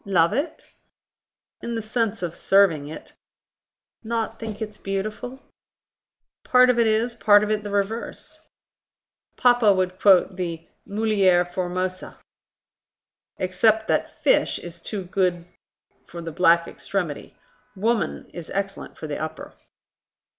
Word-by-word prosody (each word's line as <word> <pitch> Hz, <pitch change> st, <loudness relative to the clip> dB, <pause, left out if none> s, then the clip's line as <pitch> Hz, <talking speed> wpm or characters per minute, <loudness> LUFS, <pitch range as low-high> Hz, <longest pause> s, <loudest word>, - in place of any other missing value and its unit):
"Love 180 Hz, -2 st, +2 dB
it?" 285 Hz, +8 st, -3 dB, 1.0 s
"In 235 Hz, -, -4 dB
the 225 Hz, -, -2 dB
sense 225 Hz, -2 st, -1 dB
of 170 Hz, -1 st, -3 dB
serving 180 Hz, -7 st, +3 dB
it." 155 Hz, -, -10 dB, 0.9 s
"Not 225 Hz, 0 st, -3 dB
think 220 Hz, -2 st, -6 dB
it 215 Hz, -1 st, -6 dB
beautiful?" 215 Hz, +6 st, -4 dB, 1.0 s
"Part 250 Hz, 0 st, +5 dB
of 240 Hz, -, -1 dB
it 230 Hz, -, +4 dB
is, 220 Hz, +2 st, +1 dB
part 210 Hz, -3 st, +5 dB
of 210 Hz, -, -1 dB
it 215 Hz, -1 st, 0 dB
the 205 Hz, -, -5 dB
reverse." 205 Hz, +3 st, -3 dB, 1.0 s
"Papa 245 Hz, -4 st, +5 dB
would 185 Hz, 0 st, -1 dB
quote 190 Hz, -2 st, +4 dB
the 170 Hz, -3 st, -4 dB, 0.2 s
'mulier 200 Hz, -4 st, +2 dB
formosa'". 185 Hz, +1 st, -4 dB, 1.2 s
"Except 220 Hz, +4 st, +2 dB
that -, -, +1 dB
'fish' -, -, +3 dB
is 170 Hz, -1 st, -9 dB
too 200 Hz, +2 st, -4 dB
good 180 Hz, -2 st, 0 dB, 0.6 s
for 170 Hz, -, -9 dB
the 165 Hz, -1 st, -6 dB
black 170 Hz, 0 st, +4 dB
extremity. 175 Hz, -7 st, -4 dB, 0.4 s
'Woman' 220 Hz, +2 st, -1 dB
is 175 Hz, -2 st, -8 dB
excellent 195 Hz, 0 st, -4 dB
for -, -, -7 dB
the 150 Hz, -1 st, -4 dB
upper." 160 Hz, 0 st, -6 dB
200 Hz, 125 wpm, -24 LUFS, 175-220 Hz, 1.2 s, Part